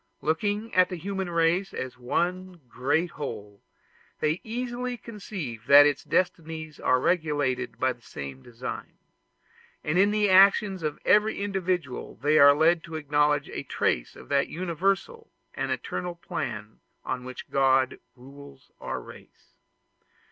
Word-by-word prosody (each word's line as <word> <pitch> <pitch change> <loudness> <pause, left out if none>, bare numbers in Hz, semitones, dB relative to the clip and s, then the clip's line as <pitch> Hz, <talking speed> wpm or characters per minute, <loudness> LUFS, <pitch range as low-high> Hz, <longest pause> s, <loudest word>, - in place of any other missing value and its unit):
Looking 205 +8 -1
at 185 0 +4
the 185 - -4
human 190 +1 -4
race 170 +3 +1
as 130 -1 -5
one 180 +8 -2
great 145 +8 0
whole, 105 -8 -7 0.6
they 155 +3 0
easily 245 +2 -4
conceive 185 - -7
that 145 +1 +9
its 145 -1 +1
destinies 160 -4 -2
are 130 0 +3
regulated 145 -6 0
by 130 0 +2
the 120 - -25
same 70 - -8
design; 120 - -7 0.9
and 155 +4 +1
in 200 +1 +5
the 210 0 +2
actions 195 0 +5
of 155 -2 -2
every 210 0 +3
individual 185 -8 -2
they 150 +3 +2
are 145 0 +8
led 160 +2 +3
to 165 - -8
acknowledge 150 -1 +1
a - - -5
trace - - -1
of - - -13
that 140 -1 +2
universal 190 - -2 0.2
and - - -3
eternal 180 -1 -3
plan 105 -9 -5 0.3
on 125 -1 -3
which 130 0 -9
God 135 -1 +3 0.2
rules 135 +1 -14
our - - -4
race. - - -15
155 Hz, 140 wpm, -27 LUFS, 135-185 Hz, 0.9 s, that